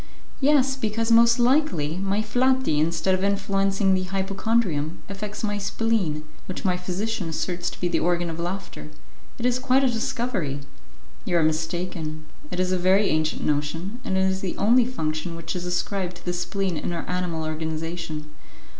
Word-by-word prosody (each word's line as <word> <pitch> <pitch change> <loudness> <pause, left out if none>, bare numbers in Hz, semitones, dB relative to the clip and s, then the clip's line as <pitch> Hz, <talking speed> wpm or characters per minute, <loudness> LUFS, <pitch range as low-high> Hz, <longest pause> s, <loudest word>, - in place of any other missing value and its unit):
"Yes, 275 -2 +4
because, 230 -2 -1
most 235 +1 +7
likely, 240 - +2
my 195 +2 0
flati, 250 - +2
instead 165 +4 +2
of 185 0 0
influencing 195 0 +2
the 185 0 +1
hypochondrium, 190 -4 0
affects 205 +2 -6
my 205 -1 0
spleen, 200 -7 0 0.2
which 185 - -5
my 180 -1 +3
physician 185 +1 -2
asserts 175 +2 -2
to - - -11
be 180 - 0
the 175 - +1
organ 175 0 +1
of 165 0 -5
laughter. 175 -2 -5 0.5
It 240 - -3
is 250 0 +2
quite 265 +1 +3
a - - +5
discovery." 235 - -1 0.6
"You 175 - +1
are 165 - +4
mistaken; 160 0 -2 0.2
it 180 - -4
is 185 0 +1
a 185 - +1
very 190 +3 +4
ancient 155 0 0
notion, 160 +9 -1
and 190 - -1
it - - +3
is 190 0 +1
the 185 - -3
only 235 +4 +5
function 160 -7 -2
which 165 +3 -5
is 180 0 -3
ascribed 180 0 -1
to 175 - -14
the 175 - 0
spleen 180 0 -1
in 175 - -3
our 165 - -4
animal 180 -3 -2
organization." 160 0 -4
185 Hz, 170 wpm, -25 LUFS, 165-215 Hz, 0.6 s, most